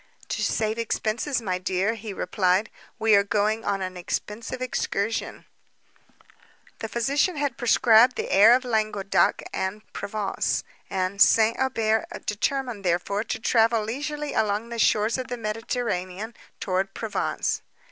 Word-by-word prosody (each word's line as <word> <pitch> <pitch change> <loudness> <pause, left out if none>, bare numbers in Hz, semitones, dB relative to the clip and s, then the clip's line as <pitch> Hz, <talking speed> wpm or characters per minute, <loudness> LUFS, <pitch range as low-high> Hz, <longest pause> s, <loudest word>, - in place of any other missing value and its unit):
"To - - -2
save 220 +1 0
expences, 230 +3 -1
my 185 -3 -1
dear," 190 +3 0
he 220 -1 -7
replied—"we 200 +4 0
are 200 0 +6
going 210 +2 0
on 200 -1 -1
an 185 0 -5
expensive 210 +7 -4
excursion." 225 -3 -2 1.3
The 225 - -5
physician 280 - +1
had 285 -4 -1
prescribed 240 0 +5
the - - -4
air 215 +5 +7
of 255 +1 -1
Languedoc 215 -4 +1
and 190 +3 -3
Provence; 205 -1 -2 0.3
and 190 +1 -2
St. 225 0 +6
Aubert 225 0 +1 0.2
determined, 235 +1 -2
therefore, 180 +4 0
to - - -2
travel 225 0 +3
leisurely 295 +6 -4
along 215 +1 0
the 235 -1 -5
shores 215 +3 +2
of 255 - -4
the 245 -1 -4
Mediterranean, 220 -2 -3 0.3
towards 190 0 -1
Provence. 225 -2 -2
220 Hz, 130 wpm, -25 LUFS, 200-235 Hz, 1.3 s, air